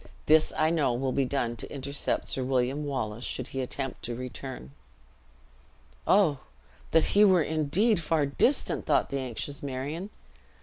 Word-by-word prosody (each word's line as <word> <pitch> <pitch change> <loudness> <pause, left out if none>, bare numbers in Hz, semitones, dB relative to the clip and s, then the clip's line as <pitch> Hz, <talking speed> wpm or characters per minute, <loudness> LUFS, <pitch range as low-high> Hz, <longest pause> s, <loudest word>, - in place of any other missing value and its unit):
This 155 0 +5
I 155 +1 +3
know 150 -7 +2
will 130 +1 -1
be 135 +1 +1
done 125 -3 -1
to - - -4
intercept 140 0 -2
Sir 130 - -2
William 130 +2 0
Wallace 120 -5 -3
should 130 0 -3
he 135 - -3
attempt 135 +1 -4
to 120 - -3
return." 125 - -7 1.4
"Oh! 175 -9 +4 0.5
That 160 -1 +4
he 205 - +6
were 185 -5 +5
indeed 160 +8 +1
far 160 -2 +1
distant!" 190 - +1
thought - - +2
the 140 - -1
anxious 130 +2 -5
Marion. 145 +8 -4
140 Hz, 155 wpm, -28 LUFS, 130-155 Hz, 1.4 s, he